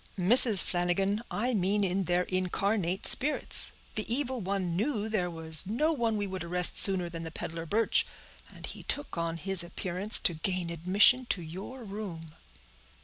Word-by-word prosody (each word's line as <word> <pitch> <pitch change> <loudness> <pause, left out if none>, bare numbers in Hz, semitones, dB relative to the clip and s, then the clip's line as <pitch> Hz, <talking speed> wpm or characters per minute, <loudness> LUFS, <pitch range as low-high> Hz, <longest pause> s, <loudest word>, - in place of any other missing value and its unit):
"Mrs. 205 +1 +6
Flanagan, 190 +4 -2
I 245 +4 -2
mean 205 0 0
in 190 0 -1
their 175 +1 0
incarnate 185 +1 -3
spirits; 295 +3 +3 0.2
the 215 +1 -4
evil 260 0 -1
one 190 -3 -3
knew 220 +1 -3
there 200 -5 -2
was 160 0 +1
no 300 +10 -1
one 230 -6 -2
we 205 - -3
would 190 -3 -7
arrest 180 +1 +5
sooner 190 -3 +6
than 165 -1 -8
the 165 - -7
peddler 165 +1 -7
Birch, 220 +6 0 0.4
and - - -11
he - - -9
took 290 0 -4
on 165 0 -4
his 190 +2 -3
appearance 185 +4 +1
to 175 - +1
gain 175 +1 -4
admission 200 +9 +2
to 180 -7 -3
your 190 +10 -10
room." 190 -7 -9
190 Hz, 165 wpm, -28 LUFS, 175-215 Hz, 0.4 s, Mrs